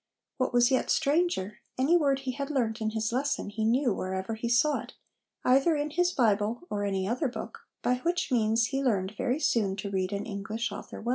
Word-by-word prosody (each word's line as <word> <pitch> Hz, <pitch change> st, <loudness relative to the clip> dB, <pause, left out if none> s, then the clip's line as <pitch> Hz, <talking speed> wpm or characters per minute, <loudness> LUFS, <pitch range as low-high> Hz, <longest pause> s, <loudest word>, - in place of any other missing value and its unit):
What 255 Hz, -2 st, 0 dB
was 245 Hz, +1 st, +4 dB
yet 260 Hz, -, +1 dB
stranger, 285 Hz, -, +1 dB, 0.2 s
any 275 Hz, +7 st, +3 dB
word 280 Hz, -5 st, +2 dB
he 265 Hz, -1 st, -2 dB
had 280 Hz, +2 st, -4 dB
learnt 235 Hz, -6 st, -1 dB
in 215 Hz, -, +1 dB
his 220 Hz, 0 st, -2 dB
lesson 270 Hz, -4 st, -1 dB
he 215 Hz, +1 st, -3 dB
knew 240 Hz, +1 st, +2 dB
wherever 190 Hz, +3 st, -3 dB
he 225 Hz, +2 st, -3 dB
saw 285 Hz, +5 st, +3 dB
it, -, -, -10 dB, 0.5 s
either 270 Hz, +6 st, +4 dB
in 295 Hz, 0 st, -2 dB
his 355 Hz, +3 st, +2 dB
Bible 225 Hz, -, +1 dB
or 205 Hz, 0 st, -1 dB
any 195 Hz, -2 st, -1 dB
other 250 Hz, +7 st, 0 dB
book, 250 Hz, -, -8 dB, 0.2 s
by 250 Hz, -, +2 dB
which 345 Hz, +3 st, -1 dB
means 225 Hz, -1 st, +3 dB
he 270 Hz, +3 st, -2 dB
learned 200 Hz, -6 st, 0 dB
very 255 Hz, +6 st, 0 dB
soon 220 Hz, -10 st, +1 dB
to 200 Hz, 0 st, -5 dB
read 185 Hz, -1 st, -1 dB
an 200 Hz, 0 st, -3 dB
English 220 Hz, +1 st, -3 dB
author 205 Hz, -, -8 dB
well." 235 Hz, -, -4 dB
235 Hz, 210 wpm, -29 LUFS, 210-275 Hz, 0.5 s, was